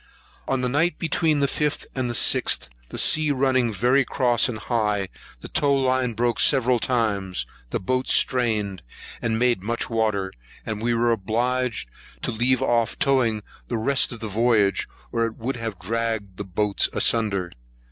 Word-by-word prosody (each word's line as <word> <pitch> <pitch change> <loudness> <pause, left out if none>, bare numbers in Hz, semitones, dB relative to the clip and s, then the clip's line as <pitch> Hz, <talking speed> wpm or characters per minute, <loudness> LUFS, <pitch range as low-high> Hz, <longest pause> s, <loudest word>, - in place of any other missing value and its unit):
On 135 -1 0
the 125 - 0
night 160 +7 +1
between 160 -2 +1
the 140 - +3
5th 150 +2 -2
and 130 -2 -2
6th, 120 - +2 0.2
the - - -7
sea 155 -1 +4
running 130 -3 +2
very 125 +7 +2
cross 120 -2 +2
and 115 - -4
high, 105 -4 -1 0.3
the - - -8
tow 140 -1 +1
line 130 -2 +1
broke 120 +1 0
several 130 -3 +3
times; 105 -7 -1 0.2
the - - -2
boats 130 +7 -1
strained, 110 -7 +1 0.4
and 115 -1 0
made 120 -4 +2
much 115 +4 -3
water; 105 -4 0 0.3
and 110 -1 -4
we 120 +1 +1
were 120 +1 +2
obliged 115 - -1 0.4
to - - -1
leave 125 +3 +1
off 120 -3 +1
towing 120 -6 +1 0.2
the 120 - -2
rest 135 +6 +2
of 120 -2 -8
the 110 - -3
voyage, 110 -1 +2 0.2
or 115 -1 +1
it 115 - -9
would 125 +3 -3
have 115 -4 -4
dragged 110 -1 -3
the 100 - -5
boats 100 +2 +1
asunder. 100 -6 +1
115 Hz, 165 wpm, -23 LUFS, 110-130 Hz, 0.4 s, sea